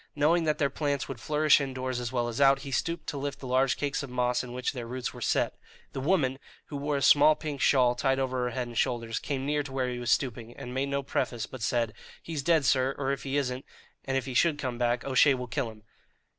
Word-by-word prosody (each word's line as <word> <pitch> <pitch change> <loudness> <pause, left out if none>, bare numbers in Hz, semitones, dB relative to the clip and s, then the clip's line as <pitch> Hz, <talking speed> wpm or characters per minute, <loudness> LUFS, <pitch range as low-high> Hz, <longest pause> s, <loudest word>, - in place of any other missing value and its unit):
Knowing 160 +3 +3
that 155 -1 +1
their 140 -3 +1
plants 145 -1 -1
would 135 -4 -6
flourish 150 +1 +4
indoors 130 -2 -3
as 120 -1 -4
well 120 -2 0
as 120 +3 -3
out, 135 0 +5
he 140 - -7
stooped 170 +6 -1
to 140 - -4
lift 140 0 -3
the - - -9
large 130 +1 +2
cakes 140 -2 -1
of 140 - -7
moss 125 0 0
in 125 - -8
which 125 +2 -2
their 120 -3 -6
roots 125 +1 -4
were - - -10
set. - - +1 0.4
The - - -4
woman, 135 -3 +1 0.3
who 145 - -4
wore 145 0 -1
a 140 - -2
small 150 +2 +7
pink 150 -3 -5
shawl 125 -3 +4
tied 135 +2 +1
over 130 -2 -1
her - - 0
head 125 +1 -3
and 120 - -9
shoulders, 115 -1 0
came 135 -2 -3
near 150 +1 +1
to 140 -1 -8
where 130 -1 -1
he 120 - -4
was 120 -1 -3
stooping, 120 -3 -1
and 125 - -7
made 135 +2 -1
no 140 0 -1
preface, 120 -4 -2
but 130 - -10
said: 115 0 0 0.3
"He's 160 -4 -4
dead, 160 0 +3
sir; 130 +1 +2
or 135 -1 -1
if 140 - -3
he 135 +1 -2
isn't, 130 -2 -1 0.4
and 135 0 -1
if 130 - -2
he 130 - -5
should 155 +4 +3
come 130 -4 -4
back, 120 0 0
O'Shea 135 +1 +5
will 125 -1 -4
kill 125 0 -2
him!" 110 -1 -14
135 Hz, 255 wpm, -28 LUFS, 125-140 Hz, 0.4 s, small